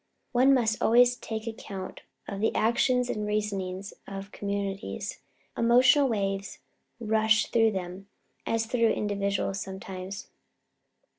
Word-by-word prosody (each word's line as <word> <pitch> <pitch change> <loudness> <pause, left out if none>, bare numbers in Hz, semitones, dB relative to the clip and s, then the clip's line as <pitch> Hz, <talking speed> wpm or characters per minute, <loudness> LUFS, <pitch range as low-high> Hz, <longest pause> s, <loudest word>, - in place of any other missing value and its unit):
One 255 +3 +5
must 225 -4 +1
always 245 +2 +5
take 220 -2 -6
account 200 -4 -7 0.3
of 200 - -5
the 220 - +1
actions 250 +2 +2
and 210 -3 -2
reasonings 195 -2 -3
of 195 +1 -7
communities. 200 0 -4 0.4
Emotional 255 +4 +5
waves 195 -3 -2 0.4
rush 220 -1 +3
through 225 -2 +4
them 185 +1 -6 0.4
as 225 0 0
through 230 0 +2
individuals 200 -1 -1
sometimes. 190 0 -7
210 Hz, 115 wpm, -28 LUFS, 195-230 Hz, 0.4 s, One